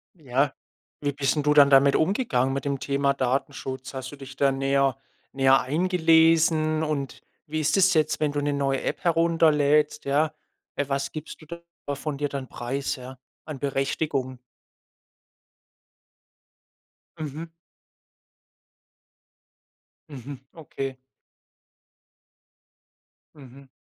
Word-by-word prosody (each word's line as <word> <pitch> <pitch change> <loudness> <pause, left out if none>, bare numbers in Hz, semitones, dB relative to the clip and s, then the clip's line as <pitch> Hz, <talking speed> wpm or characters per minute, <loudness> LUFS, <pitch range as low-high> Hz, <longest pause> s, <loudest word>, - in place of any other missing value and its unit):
Ja, 135 -3 0 0.5
wie 145 -1 -1
bist 140 0 0
'n 150 - 0
du 150 0 +3
dann 145 -1 +7
damit 140 0 +5
umgegangen 155 - +1
mit 135 +1 -4
dem 140 -1 -1
Thema 140 0 0
Datenschutz? 130 0 -3
Hast 130 -1 -6
du - - -9
dich 135 -1 -11
da 140 0 +2
näher 135 -1 +1 0.3
näher 135 0 +4
eingelesen? 160 0 +3
Und 145 -3 -3 0.2
wie 155 +1 -3
ist 155 +4 +1
es 190 -1 +5
jetzt, 155 -2 +1
wenn 150 -1 +1
du 145 0 -2
'ne 145 0 0
neue 135 -1 0
App - - -4
herunterlädst, 160 -3 +2
ja? 150 +3 +1 0.4
Äh, 145 - -1
was 135 0 -1
gibst 155 +1 -8
du - - -13
da 170 -3 -8
von 140 +1 -4
dir 145 0 -2
dann 140 -2 -5
preis, 135 +5 -3
ja, 130 0 -10 0.3
an 155 -4 -7
Berechtigung? 135 -1 -2 2.8
Mhm. 155 +2 -6 2.6
Mhm, 140 -1 -8 0.2
okay. 135 -4 -6 2.4
Mhm. 135 -1 -15
140 Hz, 120 wpm, -25 LUFS, 135-155 Hz, 2.8 s, dann